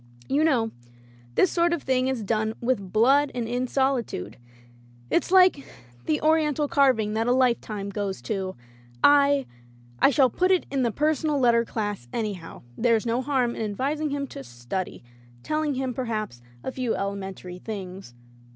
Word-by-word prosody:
"You 290 +3 +2
know, 240 -8 +2 0.6
this 370 - +4
sort 340 0 +2
of 340 - -3
thing 255 -1 +1
is 260 -4 -2
done 220 +1 -1
with 235 -7 -1
blood 270 +6 +4
and 240 -2 -2
in 245 +2 -1
solitude. 250 - -1 0.7
It's - - +1
like 365 -6 +5 0.4
the 155 - +1
Oriental 310 -2 +2
carving 255 -8 +2
that 225 +2 0
a - - +3
lifetime 235 -5 0
goes 200 -1 -3
to. 190 -3 -3 0.5
I 285 -1 +5 0.3
— 120 0 -26
I - - +7
shall 265 -2 +3
put 365 +8 +1
it 370 -2 +3
in 275 -1 0
the 240 - +2
personal 300 +3 0
letter 235 -3 +4
class, 205 - -4
anyhow.... 205 -7 -5
There's 230 -1 +2
no 235 +2 0
harm 255 -3 0
in - - -5
advising 275 +9 -1
him 280 0 -2
to 135 - -8
study 120 +10 -5 0.2
— 120 0 -25
telling 305 -2 -1
him, 260 -1 -2
perhaps, 215 - -4 0.2
a - - -3
few 255 -3 -2
elemen 195 -1 -4
tary 180 0 -9
things. 190 - -7
240 Hz, 170 wpm, -25 LUFS, 200-280 Hz, 0.7 s, I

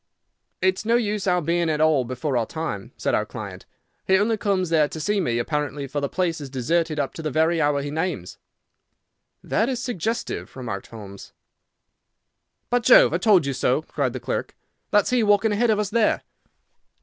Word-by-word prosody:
"It 185 0 +2
is - - -6
no 230 +2 +2
use 210 -4 0
our 180 -2 +2
being 170 +1 +1
at 155 -1 0
all 155 -5 +3
before 130 +3 -3
our 115 -2 +1
time," 155 -12 -5
said - - -1
our - - +2
client. - - -8 0.4
"He 190 - +5
only 220 +3 +2
comes 195 -4 0
there 155 -3 +4
to 160 - -7
see 205 +6 0
me, 120 -9 0
apparently, 145 +2 -2
for 145 +2 -3
the 140 - -1
place 170 -4 -1
is 140 - -7
deserted 155 +5 0
up 140 -2 -2
to - - -7
the 155 - -2
very 160 +3 +2
hour 145 -1 +1
he 145 - -4
names." 160 - -3 1.0
"That 225 +4 0
is 255 -2 -2
suggestive," 230 -2 -3
remarked 115 -7 -5
Holmes. 100 -3 -11 1.4
"By 245 - +4
Jove, - - +6
I - - +1
told 195 -8 +4
you 140 - -1
so!" 130 +3 +1
cried 140 -6 -2
the 130 - -4
clerk. - - -4 0.3
"That's 205 +2 +3
he 250 -1 +3
walking 205 0 +3
ahead 230 +3 +2
of 215 - +3
us 210 -1 -2
there." 225 -1 +2
160 Hz, 195 wpm, -23 LUFS, 140-205 Hz, 1.4 s, Jove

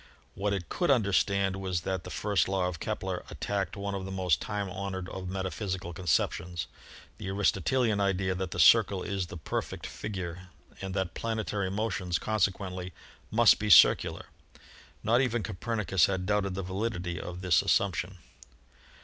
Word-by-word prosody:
What 100 +1 -1
it 95 -4 -2
could 175 - -1
understand 100 -5 +2
was 95 -3 -2
that 95 0 -3
the - - -6
first 100 -2 +1
law 95 -1 0
of 90 -4 -5
Kepler - - -3
attacked 100 0 -3
one 100 0 -3
of 95 -1 -3
the 95 - -6
most 90 -6 +1
time 105 -2 -3
honored 95 -1 -4
of 95 -1 -6
metaphysical 95 -1 -3
conceptions 85 0 0 0.3
— - - -19
the - - -6
Aristotelian 100 +3 +1
idea 95 -1 +1
that 95 0 -3
the - - -5
circle 95 -2 +6
is 100 -3 -2
the 85 - -8
perfect 80 - -4
figure 90 -3 -6 0.3
and 95 -1 -4
that 95 -3 -1
planetary 110 -4 -2
motions 100 -3 -1
consequently 95 -3 -1 0.4
must 115 +1 +5
be 105 0 -2
circular. 85 - +6 0.8
Not 115 +4 +4
even 120 -4 0
Copernicus 100 -4 +1
had 95 -2 -2
doubted 100 -2 0
the 95 - -3
validity 95 -2 -3
of 90 +1 -7
this 90 -4 +4
as - - -3
sumption. 95 -1 +1
95 Hz, 160 wpm, -29 LUFS, 90-105 Hz, 0.8 s, circle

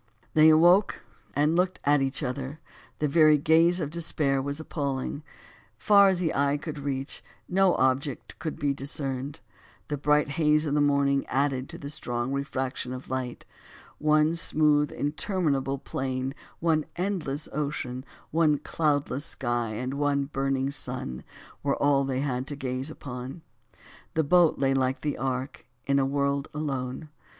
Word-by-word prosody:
They 155 0 +7
awoke 175 +6 +4 0.3
and 150 +3 +2
looked 180 +1 +1
at 145 0 +3
each 135 +2 -1
other, 135 +3 -4 0.4
the 150 - 0
very 155 0 +5
gaze 165 +4 +4
of 150 -3 -3
despair 150 -5 0
was 140 +2 -3
appalling; 140 -2 -3 0.6
far 200 -1 +6
as 185 -2 +1
the 170 -3 0
eye 140 +1 +2
could 150 0 -6
reach, 135 0 -4 0.2
no 190 0 +3
object 130 +1 -1
could 155 - -4
be 145 -3 0
discerned; 140 0 -3 0.5
the 145 -2 -2
bright 150 +1 +3
haze 150 0 +2
of 145 - -1
the 150 - +3
morning 140 -1 +2
added 135 -1 0
to 170 - -7
the 140 - -7
strong 120 -4 -3
refraction 135 -2 -3
of 130 0 -8
light; 130 -2 -4 0.5
one 155 +1 +3
smooth, 150 -3 +3
interminable 145 -3 -1
plain, 130 0 -3 0.3
one 160 -2 +2
endless 170 -6 -1
ocean, 140 -3 -3 0.3
one 155 -2 +3
cloudless 145 -1 -1
sky 120 -7 -2
and 125 +4 -3
one 140 0 +1
burning 135 -1 -1
sun, 125 - -4 0.4
were 140 -1 +1
all 140 -1 +3
they 135 -1 -1
had 130 -2 -2
to 145 - -4
gaze 130 0 -3
upon. 130 +1 -8 0.7
The 160 - +3
boat 170 +2 +4
lay 135 -1 +2
like 130 0 0
the 150 -1 -2
ark, 130 +1 -3 0.2
in 140 0 +2
a 135 - +2
world 140 0 0
alone! 135 -1 -3
140 Hz, 150 wpm, -27 LUFS, 135-155 Hz, 0.7 s, They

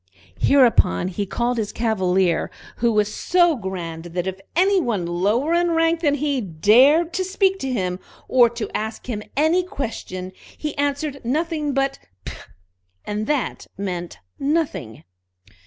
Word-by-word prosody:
Hereupon 235 - +4
he 200 +2 -3
called 240 +4 -1
his 210 -2 -2
Cavalier, 190 -6 +1 0.3
who 235 0 +2
was 210 -1 +1
so 345 -2 +3
grand 175 -6 -5
that 175 +1 -3
if 190 0 -4 0.2
any 380 +2 +4
one 215 - -1
lower 205 - +1
in 345 0 +2
rank 330 0 +2
than 295 -4 +2
he 285 -2 -1
dared 250 - +4
to 375 - 0
speak 385 +1 +1
to 270 - -3
him, 185 -6 -2 0.3
or 245 -2 +5
to 235 -2 -5
ask 220 +1 -4
him 220 -4 -3 0.2
any 320 +5 +3
question, 220 - -5 0.3
he 300 -1 -4
answered 285 0 -2
nothing 300 +2 -1
but 275 0 0 0.3
"P!" - - -5 0.7
and 210 +1 -3
that 295 -5 -2
meant 180 -3 -4 0.2
nothing. 280 - -2
240 Hz, 145 wpm, -22 LUFS, 190-300 Hz, 0.7 s, or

